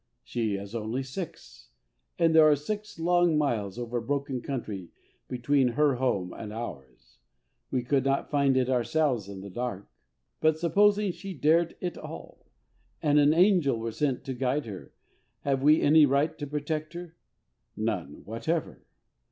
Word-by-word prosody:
She 110 -4 -2
is 100 +2 -7
only 115 +3 -2
six, 155 +6 -8 0.5
and 165 -1 +3
there 160 -1 +7
are 150 - +5
six 205 +8 -5
long 175 -1 +3
miles 110 -9 -1
over 120 0 -3
broken 140 0 -2
country 105 -10 -5 0.4
between 130 +2 +1
her 145 -2 +2
home 100 -8 -1
and 105 -2 -7
ours. 90 - -9 0.5
We 125 -2 -1
could 135 +2 +1
not 135 0 0
find 140 -2 +3
it 130 -1 +2
ourselves 130 -3 +1
in 95 -1 -8
the 100 - -8
dark. 110 -2 -4 0.5
But 155 0 +3
supposing 205 +4 +3
she 195 +1 -8
dared 160 +3 +2
it 180 -1 -4
all, - - -10 0.5
and 150 -1 +3
an 145 0 +5
angel 175 - +4
were 115 0 -4
sent 135 +1 -1
to 135 - -4
guide 130 +3 -1
her, 100 -5 -9 0.5
have 135 -2 0
we 150 +3 +5
any 150 0 +6
right 140 +4 +1
to 145 - -4
protect 150 +2 -3
her? 170 -1 -8 0.6
None 70 +2 -3
whatever. 145 - -3
140 Hz, 155 wpm, -28 LUFS, 120-160 Hz, 0.6 s, there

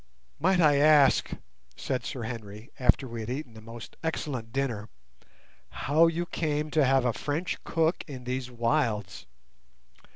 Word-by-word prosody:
"Might 185 +3 +3
I 150 -4 +5
ask," 145 -2 +5 0.5
said 125 -3 -2
Sir 125 - -5
Henry, 110 -1 -7
after 130 +1 +3
we 115 -1 -6
had 110 +1 -5
eaten 130 -2 -5
a 110 - -11
most 115 +1 -10
excellent 135 -8 -3
dinner, 115 -5 -2 0.8
"how 155 +4 +3
you 165 +1 -1
came 150 -2 -2
to 155 - +3
have 135 -1 +3
a 120 - +2
French 155 +8 -3
cook 165 +1 0
in 130 -4 -8
these 125 0 -3
wilds?" 115 -4 -1
130 Hz, 150 wpm, -28 LUFS, 115-155 Hz, 0.8 s, I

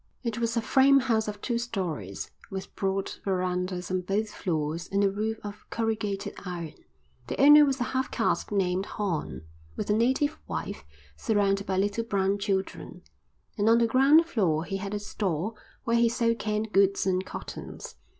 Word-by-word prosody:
It 230 -2 -2
was 230 0 0
a 230 - +1
frame 275 +2 +5
house 225 -4 +1
of 205 -1 -5
two 235 -2 -1
storeys, 175 - -4 0.2
with 190 0 -7
broad 195 0 -1
verandahs 180 -1 -1
on 185 0 0
both 205 +4 -1
floors 160 -1 -2
and 200 +1 +2
a 195 - +3
roof 215 +2 -2
of 205 0 -9
corrugated 210 -3 -2
iron. 170 -4 -5 0.5
The - - -4
owner 295 +2 +9
was 270 -1 0
a - - +1
half 260 +1 -1
caste 225 - 0
named 190 -1 0
Horn, 180 - -3 0.3
with - - -2
a - - +4
native 260 +7 +1
wife 75 - -4 0.3
surrounded 200 - +1
by 190 - 0
little 205 +4 0
brown 200 -2 0
children, 195 -1 -3 0.6
and 210 +2 +3
on 230 - +6
the 235 - +4
ground 275 +7 +5
floor 180 - 0
he 195 - -3
had 195 +1 -4
a - - -2
store 200 -1 -2 0.3
where 235 0 +2
he 235 0 +4
sold 230 -1 +1
canned 215 0 -2
goods 195 0 +3
and 185 -1 +1
cottons. - - -8
205 Hz, 175 wpm, -27 LUFS, 190-230 Hz, 0.6 s, owner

